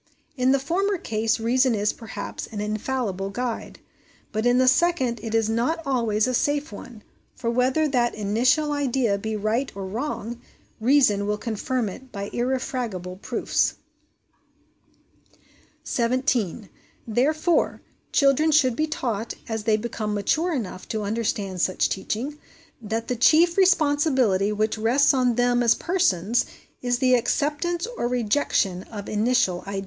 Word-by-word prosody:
In 255 -1 +2
the 275 - +4
former 370 +8 0
case 225 -6 -1
reason 250 +2 +2
is, 205 0 0
perhaps, 225 -2 -7
an 210 - -7
infallible 210 -2 -2
guide, 240 +3 -4 0.5
but 220 +2 0
in 245 0 +4
the 255 0 +3
second 260 -5 +2
it 225 0 -3
is 225 -1 +2
not 235 +9 0
always 230 -6 +1
a 255 - -1
safe 290 +2 0
one; 215 +1 -10 0.3
for 230 -2 -2
whether 260 +6 +2
that 245 -4 +1
initial 245 +9 +1
idea 260 -7 0
be 220 +2 -3
right 215 +6 -1
or 195 -1 -5
wrong, 235 +2 -4 0.4
reason 220 -5 +3
will 210 0 0
confirm 230 +2 -2
it 255 +6 -9
by 200 -1 -6
irrefragable 240 -7 -2
proofs. - - 0 2.1
17. 235 -5 0 0.4
Therefore 305 +9 +1 0.3
children 280 +2 +3
should 265 -6 +4
be 310 +4 0
taught, 235 -7 -3
as 220 -2 -4
they 220 -1 +3
become 215 -1 -3
mature 315 - 0
enough 215 - -4
to 215 -1 -3
understand 205 -3 -2
such 185 - +1
teaching, 250 +10 -3 0.4
that 225 +1 -3
the 250 - -1
chief 320 +8 +4
responsibility 290 - +3
which 215 +1 -1
rests 260 +7 +4
on 250 -3 +2
them 245 0 +2
as 235 -1 +4
persons 245 - +1 0.3
is 245 -1 0
the 255 0 +3
acceptance 300 - 0
or 240 - +1
rejection 220 -6 0
of 205 -2 -8
initial 210 -4 +1
ideas. 200 0 -3
240 Hz, 140 wpm, -24 LUFS, 215-270 Hz, 2.1 s, the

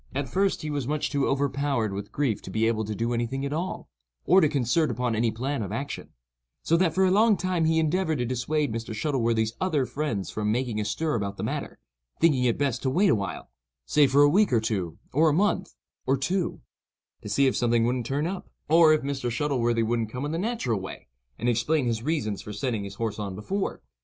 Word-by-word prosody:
At 140 0 -1
first 195 +5 +1
he 155 - -3
was 145 -3 -2
too - - -5
much 150 -1 -1
overpowered 140 -5 0
with 100 +1 -6
grief 135 -8 0
to - - -9
be 110 +4 +1
able 110 -1 0
to 105 +1 -4
do 115 +3 -1
any 120 0 0
thing 135 +3 -3
at 140 - -3
all, 175 +4 -3 0.4
or 185 +3 +6
to 155 - +4
concert 140 +4 +1
upon 125 -1 -1
any 115 +1 +1
plan 130 +4 -2
of 100 -2 -4
action; 135 +5 -5 0.5
so 165 - +2
that 165 -3 +1
for 190 0 +4
a 185 - +3
long 215 +1 +4
time 180 -3 0
he 160 0 +2
endeavored 160 0 +1
to 125 - -1
dissuade 130 +2 -1
Mr. 115 -1 -4
Shuttleworthy's 115 -4 0
other 155 -8 +1
friends 125 -10 -3
from 105 0 -1
making 120 -2 -1
a - - -3
stir 155 +10 -1
about 100 -3 -2
the - - -4
matter, - - -4 0.4
thinking 145 -6 +3
it 120 - +2
best 140 -4 0
to 130 - 0
wait 185 +9 +3
awhile—say 100 - -1
for 140 +2 +5
a - - +7
week 200 +7 +3
or 120 - +4
two, 95 -7 -2 0.2
or 155 +4 +4
a - - +2
month, 190 +2 0 0.3
or 135 +1 +3
two—to 175 +7 -5
see 140 - +3
if 130 - +2
something 120 -1 +2
wouldn't 120 -1 -1
turn 145 +3 -1
up, 185 +2 -5 0.2
or 160 0 +6
if 155 - +1
Mr. 135 -3 -2
Shuttleworthy 120 -3 0
wouldn't 115 -1 -1
come 125 +5 -4
in 145 - -3
the 165 - -2
natural 195 - -1
way, 95 -9 -9 0.3
and 120 - -2
explain 125 +5 +1
his 115 -2 -1
reasons 120 -8 -1
for 105 - -8
sending 105 -1 -2
his 100 - -8
horse 110 -2 -3
on 100 -3 -4
before. 190 - -3
130 Hz, 220 wpm, -26 LUFS, 115-155 Hz, 0.5 s, a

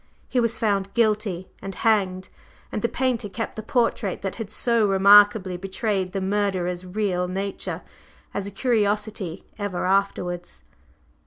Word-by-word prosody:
He 255 - 0
was 230 -1 +1
found 200 -3 0
guilty 210 -5 +1
and 195 -1 -6
hanged, 190 -4 +1 0.4
and - - -2
the - - +1
painter 250 -5 -1
kept 225 +4 -4
the 220 - -4
portrait 225 -4 0
that 195 - -3
had 225 -3 -5
so 230 -1 +2
remarkably 200 -1 +6
betrayed 195 0 -2
the 195 0 -2
murderer's 190 -3 0
real 185 -1 -1
nature, 195 +2 -4 0.5
as 200 0 -3
a - - -4
curiosity 210 -5 -1
ever 200 -4 -2
afterwards." 180 -2 -1
200 Hz, 140 wpm, -24 LUFS, 185-215 Hz, 0.5 s, remarkably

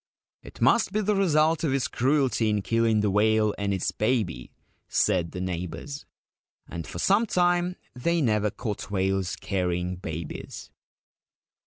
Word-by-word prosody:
' - - -70
It - - -16
must 235 - +4
be 215 - +1
the 210 +1 +1
result 160 -4 +2
of 145 -5 +1
his 135 -2 0
cruelty 130 -4 +1
in 105 -2 0
killing 115 -1 +2
the 105 -1 +1
whale 105 +1 +3
and 100 0 -1
its 95 -2 -1
baby/ 105 - -1 0.4
said 85 -2 +1
the 90 - -6
neighbours; 90 - -5 0.6
and 85 -2 -6
for - - -7
some 200 - +3
time 175 -1 +2 0.2
they 170 +7 0
never 105 -6 +2
caught 105 0 -5
whales 95 -1 0
carrying 90 -2 -2
babies. 80 -3 -7
110 Hz, 150 wpm, -26 LUFS, 95-150 Hz, 0.6 s, must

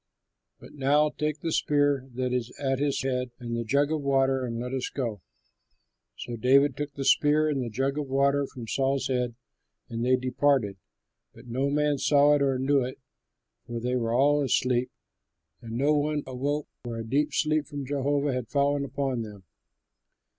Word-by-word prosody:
But - - -14
now 145 +2 +2
take 150 -1 -3
the 165 - -2
spear 145 -3 +1
that 125 0 -1
is 125 -2 -1
at 135 -2 0
his 140 -2 0
head 125 -1 -1
and 120 -2 -5
the 115 - -2
jug 140 +6 +1
of 155 -1 -1
water, 135 -1 +2
and 115 -2 -3
let 125 +2 -4
us 130 -2 -2
go." 115 -8 -4 1.0
So 120 - -6
David 135 +3 +4
took 145 -1 -4
the 135 - -4
spear 150 +2 +4
and 145 -3 0
the 120 - -3
jug 135 +6 -1
of 145 - -3
water 140 +1 +2
from 120 -4 -9
Saul's 135 +3 0
head, 125 -2 -1 0.5
and 115 0 -3
they 130 +1 +4
departed. 130 -4 +1 0.6
But 125 - -14
no 130 +4 0
man 145 0 +1
saw 145 +1 +5
it 145 - +2
or 135 -2 +2
knew 135 +2 +2
it, 130 +1 -5 0.7
for 120 -1 -4
they 125 +2 -1
were 115 -2 -1
all 145 +4 +3
asleep, 125 -1 +1 0.7
and 115 -2 -8
no 140 +6 +2
one 150 0 0
awoke, 140 +3 -2 0.2
for 120 -2 -5
a 115 - -5
deep 145 +6 +1
sleep 155 0 +1
from 145 -2 -6
Jehovah 140 +1 0
had 125 -3 -3
fallen 140 +2 +1
upon 135 -3 -2
them. 105 -3 -9
135 Hz, 180 wpm, -27 LUFS, 125-145 Hz, 1.0 s, saw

